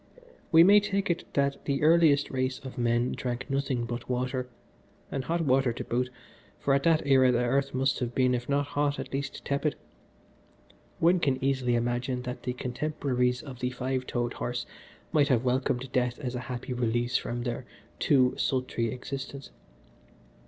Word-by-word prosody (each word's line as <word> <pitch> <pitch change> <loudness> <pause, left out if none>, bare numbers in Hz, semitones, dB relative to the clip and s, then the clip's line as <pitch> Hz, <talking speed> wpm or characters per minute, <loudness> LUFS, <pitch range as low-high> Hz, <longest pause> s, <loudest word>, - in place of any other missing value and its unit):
"We 165 0 +8
may 205 +3 +8
take 200 -2 0
it 170 - -4
that 140 0 +1
the 140 0 0
earliest 155 -3 +5
race 130 0 -1
of 130 - -7
men 120 +1 +1
drank 125 +1 -4
nothing 135 -3 0
but 120 +1 -6
water, 125 0 -1 0.6
and 135 - -2
hot 170 +4 -1
water 135 -4 +3
to - - -5
boot, 125 +1 -1 0.5
for 140 - +1
at 135 - +3
that 160 0 +3
era 130 -2 +5
the 120 0 +1
earth 135 +2 0
must 135 +1 +1
have 120 -1 -3
been, 130 -1 +3
if 120 +1 -3
not 145 0 +2
hot, 145 0 0
at - - -6
least 140 +1 -4
tepid. 140 +1 0 1.2
One 175 +2 +4
can 135 -5 +1
easily 130 -3 +1
imagine 120 +1 -1
that 125 0 -5
the 125 - -3
contemporaries 125 -1 -1
of 130 -4 -9
the 125 - -1
five 130 0 -3
toed 120 0 -1
horse 120 0 -3 0.5
might 145 -2 +4
have 130 -4 +2
welcomed 130 0 0
death 125 -1 0
as 130 -4 -4
a 125 - -3
happy 125 0 -4
release 120 0 0
from 120 0 -4
their 120 0 -4 0.3
too 130 -3 +4
sultry 125 -3 0
existence. 135 +2 -6
130 Hz, 175 wpm, -28 LUFS, 125-140 Hz, 1.2 s, We